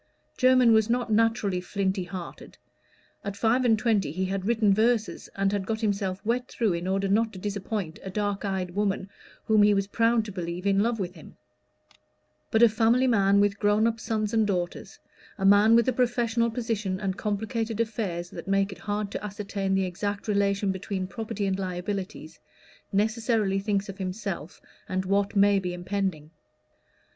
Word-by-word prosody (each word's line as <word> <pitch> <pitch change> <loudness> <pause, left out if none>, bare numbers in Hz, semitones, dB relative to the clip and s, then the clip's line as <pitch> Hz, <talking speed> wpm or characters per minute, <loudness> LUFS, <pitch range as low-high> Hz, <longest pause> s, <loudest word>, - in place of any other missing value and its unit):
Jermyn 255 -2 +5
was 220 0 +4
not 240 -1 0
naturally 215 -4 +2
flinty 190 0 -2
hearted: 175 -1 -9 0.7
at 200 -1 -5
five 230 +4 +2
and 225 -3 +4
twenty 215 -8 +1
he 185 +4 -2
had 190 0 -3
written 220 -3 +3
verses, 225 +1 0
and 195 0 +1
had 200 -2 -2
got 220 -1 -1
himself 200 -3 -1
wet 245 +3 0
through 220 -6 0
in 170 +1 -3
order 195 +1 0
not 220 +3 +2
to - - -9
disappoint 200 -3 -4
a 190 - -7
dark 205 +1 -2
eyed 190 -3 -2
woman 195 0 -1 0.3
whom 215 -1 +4
he 205 0 +5
was 195 0 +1
proud 230 +2 +2
to 210 - -6
believe 175 0 -5
in 195 -1 +3
love 225 +2 +1
with 180 -2 -3
him; - - -14 1.1
but 225 0 +4
a - - +10
family 230 +3 +3
man 200 -5 +4
with 205 0 +2
grown 205 +1 +3
up 230 0 0
sons 215 -1 -2
and 220 -2 +3
daughters, 180 -3 -3 0.4
a 195 - -2
man 205 +3 +6
with 235 +1 +4
a 255 - +2
professional 235 -1 +1
position 220 -5 -2
and 190 -2 -2
complicated 220 +2 -2
affairs 200 -7 -2
that - - -8
make 195 0 +1
it 190 - -10
hard 205 -1 -3
to - - -5
ascertain 200 -1 -2
the 190 0 +1
exact 200 +3 -4
relation 200 -1 +1
between 190 0 -4
property 205 +2 -4
and 190 0 -1
liabilities, 185 -3 -5 0.5
necessarily 215 -1 +1
thinks 200 0 -1
of 195 0 -8
himself 190 -2 -5 0.3
and 185 0 -1
what 200 +2 0
may 200 0 +5
be 180 -2 -4
impending. 180 -4 -3
200 Hz, 175 wpm, -27 LUFS, 190-220 Hz, 1.1 s, a